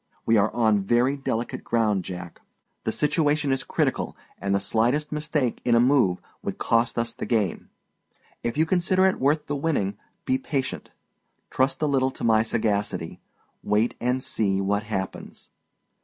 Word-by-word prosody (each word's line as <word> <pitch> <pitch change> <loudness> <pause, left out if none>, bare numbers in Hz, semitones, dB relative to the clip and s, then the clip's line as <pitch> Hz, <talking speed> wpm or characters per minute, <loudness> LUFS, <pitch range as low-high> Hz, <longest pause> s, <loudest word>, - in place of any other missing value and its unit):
We 115 - +4
are 105 0 +3
on 110 -4 +2
very 120 +7 +2
delicate 120 -4 -3
ground, 110 -5 +1
Jack; 90 -2 -7 0.4
the - - +1
situation 150 -1 +1
is 135 -1 0
critical, - - -1 0.2
and 100 0 0
the - - +2
slightest 120 +9 +1
mistake 150 -4 -1
in 120 - +3
a - - +5
move 120 -8 +3 0.2
would - - -4
cost 115 +1 +1
us 115 0 -1
the - - -6
game. 110 -7 -1 0.7
If 120 +3 -3
you 160 - +4
consider 185 +2 +2
it 190 - +2
worth 150 +3 +2
the 145 - -2
winning, 135 -10 -1 0.3
be 260 0 +1
patient. 140 - -3 0.6
Trust 135 +4 +1
a - - +4
little 135 -3 +2
to - - -9
my 110 -1 +4
sagacity. 105 -6 -1 0.4
Wait 105 +3 +1
and 125 +1 0
see 100 -3 0
what 100 +1 +1
happens. 95 -3 -5
120 Hz, 160 wpm, -25 LUFS, 105-145 Hz, 0.7 s, a